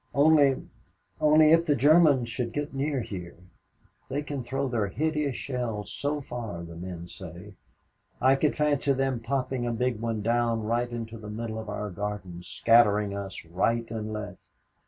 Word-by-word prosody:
Only 145 -2 +4 0.5
only 155 0 +6
if 165 +1 +5
the 145 - +4
Germans 145 -2 +5
should 120 0 -3
get 145 0 -3
near 135 0 -1
here 90 -6 -7 0.7
they 145 +3 -2
can 145 -2 -4
throw 135 +3 -2
their 115 -5 0
hideous 150 +2 -1
shells 120 -6 -4
so 145 +1 -1
far, 115 -10 -6
the 85 -1 -9
men 85 0 -7
say 95 +3 -10 0.7
I 130 +1 +5
could 145 +1 +1
fancy 145 -2 +2
them 135 -2 0
popping 125 0 -2
a - - 0
big 120 -1 -1
one 115 -2 -2
down 115 0 +1
right 120 +2 0
into 115 -1 -6
the 105 -1 -8
middle 110 +1 -4
of 110 -1 -7
our 105 0 -4
garden, 95 -2 -5
scattering 105 +2 +3
us 100 -3 -6
right 115 +7 0
and 110 -1 -4
left. 105 -2 -6
115 Hz, 165 wpm, -27 LUFS, 105-135 Hz, 0.7 s, only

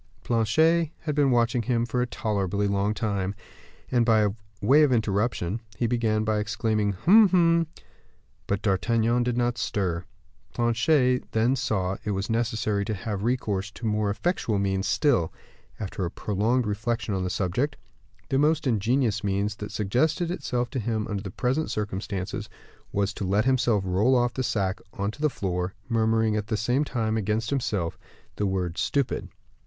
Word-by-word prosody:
Planchet 155 +9 +3
had 155 -2 -2
been 145 -1 +3
watching 120 -1 +2
him 120 0 0
for 125 +1 -1
a 125 - 0
tolerably 100 -3 -1
long 100 +1 0
time, 100 -2 -1 0.6
and, 120 -2 +3
by 110 -3 +4 0.3
way 135 +9 +5
of 150 -3 +4
interruption, 110 -3 0 0.2
he 120 - 0
began 110 -2 +1
by 110 -1 +1
exclaiming, 105 -1 0
"Hum! 195 - +6
hum!" 170 -2 +3 0.8
But 100 -1 -1
D'Artagnan 115 +4 +2
did 120 0 0
not 120 -1 0
stir. 95 -4 -1 0.5
Planchet 125 +2 +2
then 115 +4 +3
saw 105 -8 -1
that - - -9
it 105 - -2
was 100 +3 -2
necessary 110 -3 0
to 110 - -2
have 100 +1 -4
recourse 105 -4 -1
to 120 - -8
more 105 -1 +1
effectual 110 - -1
means 95 0 0
still: 115 - +2 0.5
after 95 -2 -4
a 85 - -1
prolonged 110 +7 0
reflection 110 +1 -2
on 95 -1 -1
the 90 - -1
subject, 105 - -1 0.5
the 135 - +2
most 155 +1 +2
ingenious 115 -2 +1
means 100 +1 -1
that 105 - -6
suggested 150 - 0
itself 125 -9 -2
to 130 - -2
him 110 -1 -2
under 100 -2 -2
the 100 - -6
present 130 +10 -1
circumstances, 100 -2 -4 0.4
was 100 0 0
to - - -5
let 100 +4 +1
himself 120 -6 +2
roll 100 +8 +3
off 120 0 +2
the 130 - -2
sack 100 -6 -1
on 100 +1 -2
to 145 - -13
the 155 - +3
floor, 90 -5 -3
murmuring, 110 -2 +2
at 105 -1 -2
the 110 - -1
same 120 +7 +1
time, 110 -6 -1
against 110 +2 -1
himself, 110 -11 -1 0.4
the 105 - 0
word 90 -3 -2
"stupid." 100 +8 -1
110 Hz, 170 wpm, -26 LUFS, 100-125 Hz, 0.8 s, Hum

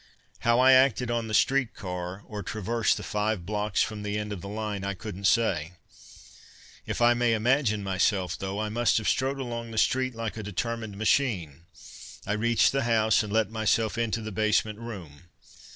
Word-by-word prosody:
How 115 +1 +3
I 130 +1 +7
acted 130 -2 +4
on 115 -1 -1
the 110 - -5
streetcar, 95 -9 -1
or 105 -1 -6
traversed 110 +3 0
the - - -6
five 105 -3 -2
blocks 105 0 0
from 110 -1 -5
the 105 0 -3
end 105 0 -3
of 95 - -7
the 100 - -7
line, 105 -2 -4
I 100 0 -2
couldn't 100 +1 -7
say. 90 -8 +1 1.1
If - - -3
I 120 0 +6
may 120 -1 +2
imagine 110 -2 +1
myself, 95 -2 0
though, 95 +1 -4
I 110 0 -2
must 120 +2 +2
have 110 - -1
strode 135 +1 +1
along 120 -3 -5
the 110 - -8
street 130 +1 +1
like 115 -1 -4
a - - -4
determined 110 +1 -4
machine. 100 - 0 0.6
I 105 - -1
reached 115 +2 +3
the 135 - 0
house 110 -2 +3
and 105 -2 -5
let 110 -1 +1
myself 110 0 +1
into 115 -1 -1
the 110 - -5
basement 110 +1 0
room. 90 -9 -9
110 Hz, 185 wpm, -27 LUFS, 100-115 Hz, 1.1 s, I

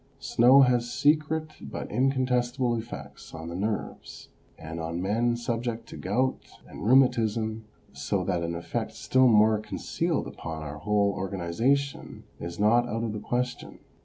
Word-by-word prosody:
Snow 125 +4 +5
has 120 -2 +2
secret 155 +1 +1
but - - -6
incontestable 125 -1 +1
effects 70 - -8
on 80 +1 -7
the 85 - -6
nerves, 105 +3 -4 0.3
and 80 +1 -7
on 80 +1 -3
men 115 +6 +1
subject 120 -1 -3
to - - -9
gout 130 +1 -1 0.3
and - - -9
rheumatism, 110 -3 +2 0.3
so 100 -3 -2
that 90 -2 -1
an 85 0 -3
effect 85 0 -4
still 130 0 +3
more 110 -1 +5
concealed 110 - -2
upon 80 -2 -7
our 75 0 -7
whole 105 +1 +2
organisation 100 +10 -1 0.2
is 85 0 -6
not 120 +3 +3
out 115 +1 -2
of 110 -2 -2
the 105 - -4
question. 125 +3 -3
115 Hz, 145 wpm, -27 LUFS, 95-125 Hz, 0.3 s, Snow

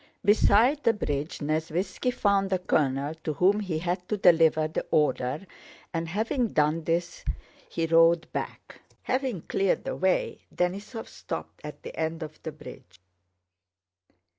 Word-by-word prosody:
Beside 220 +7 +4
the 230 - +4
bridge 150 -7 -3
Nesvítski 165 - -1
found 200 -4 +2
the 190 - +2
colonel 145 -4 0
to 155 - -1
whom 190 +7 +3
he 185 -6 -2
had 180 +2 -3
to 210 - 0
deliver 160 -4 +5
the 155 - -3
order, 150 +1 +1 0.5
and 165 0 -2
having 225 +6 0
done 155 -2 +1
this 170 +1 -1 0.5
he 165 - -1
rode 165 +1 +5
back. - - -6 0.2
Having 255 - -1
cleared 195 -1 0
the - - -3
way 190 0 0 0.2
Denísov 200 +6 -2
stopped - - -7
at - - -9
the - - -8
end 160 +1 -2
of 155 0 -10
the 160 - -5
bridge. 115 - -13
170 Hz, 140 wpm, -27 LUFS, 155-200 Hz, 0.5 s, deliver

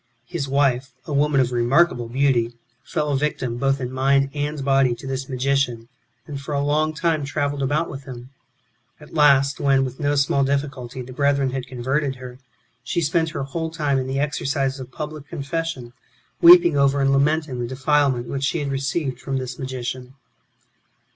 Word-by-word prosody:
His 160 -6 -4
wife, 135 -2 +1
a 150 - -5
woman 145 0 +2
of 125 -1 +2
remarkable 120 +1 +2
beauty, 125 -2 +1 0.3
fell 150 -4 -2
a - - +1
victim 130 -4 -2
both 135 +2 +1
in 125 -1 -4
mind 135 +1 +2
and 145 -1 -3
body 135 -3 +3
to 120 - -12
this 135 0 -4
magician, 130 -3 -1 0.4
and, 140 -1 -6
for 145 +1 -4
a 140 0 0
long 155 +2 +1
time, 155 -1 0
travelled 145 0 -2
about 145 +5 0
with 135 -1 -8
him. 125 -1 -9 0.7
At 150 - -15
last, 140 -3 +4
when, 135 -1 +3
with 130 0 -7
no 145 0 +1
small 140 0 +2
difficulty, 135 -2 -2
the 130 +1 -10
brethren 140 -1 +1
had 130 -1 -4
converted 135 +3 -1
her, 125 0 -10 0.4
she - - -1
spent 160 +1 +1
her 145 - -4
whole 160 +4 -3
time 150 -4 0
in 130 - -3
the 135 +1 -2
exercise 140 -2 -1
of 130 -1 -9
public 150 0 -7
confession, 145 -5 -4 0.5
weeping 175 -2 +8
over 140 0 +3
and 135 0 +3
lamenting 145 -1 +1
the 120 - -2
defilement 130 -1 +1
which 140 0 -3
she 155 - 0
had 145 -3 -2
received 135 -1 -2
from 135 +1 -3
this 130 -1 -5
magician. 130 0 -5
140 Hz, 180 wpm, -22 LUFS, 130-145 Hz, 0.7 s, weeping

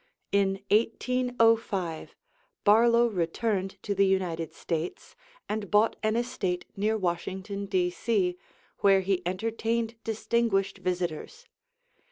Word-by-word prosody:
In 195 -1 +1
1805 230 -6 +1 0.5
Barlow 235 +3 +5
returned 195 0 -1
to 205 - -1
the 195 0 +3
United 175 -4 -1
States 165 0 -4 0.3
and 210 -2 -3
bought 210 +2 +3
an 215 0 +1
estate 230 -7 -2
near 215 +2 +1
Washington, 190 +2 -3
D.C., 180 +1 0 0.4
where 195 -1 +5
he 190 -1 0
entertained 225 +4 -1
distinguished 220 -3 0
visitors. 180 - -3
200 Hz, 100 wpm, -28 LUFS, 185-225 Hz, 0.5 s, Barlow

